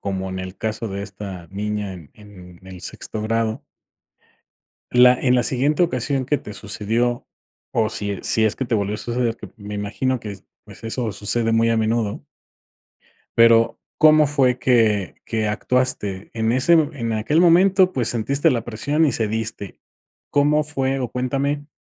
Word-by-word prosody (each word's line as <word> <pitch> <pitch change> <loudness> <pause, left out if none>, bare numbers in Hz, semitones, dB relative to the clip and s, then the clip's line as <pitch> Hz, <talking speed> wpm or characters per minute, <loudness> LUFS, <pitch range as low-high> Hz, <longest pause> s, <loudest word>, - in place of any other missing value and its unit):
Como 95 -1 -4
en 95 - -5
el 95 +1 -7
caso 110 +1 -3
de 100 0 -5
esta 95 -3 -8
niña 105 0 -3
en 85 -5 -12
en 95 -4 -15
el 90 -1 -10
sexto 105 +2 -5
grado. 110 0 -1 1.3
La 125 0 +6
en 125 -1 +2
la 125 - +2
siguiente 145 +7 +2
ocasión 135 -3 -1
que 145 +2 +1
te 105 - -10
sucedió, 110 +4 -2 0.4
o, 110 -2 +1
si 105 -3 -2
si 110 -1 +5
es 105 - 0
que - - -3
te 120 -2 -3
volvió 105 0 0
a - - -8
suceder, 120 -1 -2
que 105 - -11
me 105 0 -8
imagino 115 +5 -2
que 105 - -6
s 95 0 -13 0.2
pues, 105 +1 -15
eso 115 -1 -2
sucede 115 +3 +1
muy 115 0 +3
a 115 - +2
menudo. 110 -1 -1 1.1
Pero, 115 0 +5 0.2
¿cómo 155 -1 +6
fue 135 -3 +2
que 110 -6 +1
que 110 -2 -2
actuaste? 105 -4 -1
En 110 0 0
ese 130 +8 +3
mome 150 -4 +1
en 115 -1 -2
aquel 110 +9 +1
momento, 185 +2 +4
pues, 120 -4 0
sentiste 140 +7 +1
la 120 -5 -1
presión 145 +8 0
y 140 - +2
cediste, 110 -2 -2 0.5
¿cómo 150 +1 +3
fue? 135 -2 -2
O, 125 -3 -3
cuéntame 140 +3 -2
115 Hz, 170 wpm, -21 LUFS, 105-130 Hz, 1.3 s, La